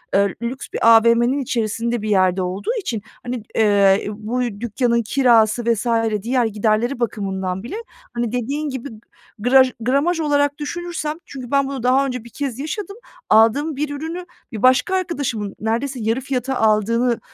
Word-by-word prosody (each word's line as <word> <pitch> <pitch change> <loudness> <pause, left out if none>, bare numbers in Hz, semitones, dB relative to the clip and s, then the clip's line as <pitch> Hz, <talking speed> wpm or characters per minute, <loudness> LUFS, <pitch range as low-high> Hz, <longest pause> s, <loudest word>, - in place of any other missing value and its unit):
ııı, 200 0 +4
lüks 245 +3 -4
bir - - -2 0.2
AVM'nin 235 +4 +3
içerisinde 235 -2 -1
bir 215 - -3
yerde 185 -2 +3
olduğu 185 +2 -2
için, 235 - -3 0.2
hani, 245 -2 -4
ııı, 200 -2 +4 0.3
bu 250 +3 0 0.2
dükkânın 235 +1 +1
kirası 235 -2 +3
vs. 225 +2 -4 0.4
diğer 245 +3 +1
giderleri 220 +4 0
bakımından 190 -4 -2
bile, 240 - -6 0.4
hani, 235 -2 -2
dediğin 280 +5 -2
gibi 265 0 -5 0.5
graj 255 +3 +5
gramaj 280 +9 +1
olarak 285 -2 +1
düşünürsem, 315 0 -4
çünkü 255 -3 -9
ben 275 -1 +2
bunu 270 -3 -5
daha 260 +2 +3
önce 250 -3 -4
bir 235 - -12
kez 270 -2 -4
yaşadım. 395 +8 -5 0.3
Aldığım 275 +8 +4
bir 295 +2 -2
ürünü 320 +5 -5 0.3
bir 215 - -6
başka 255 +8 +4
arkadaşımın 280 - -2
neredeyse 235 +4 -2
yarı 225 +4 0
fiyata 265 0 -2
aldığını 230 +2 +2
245 Hz, 150 wpm, -20 LUFS, 220-280 Hz, 0.5 s, graj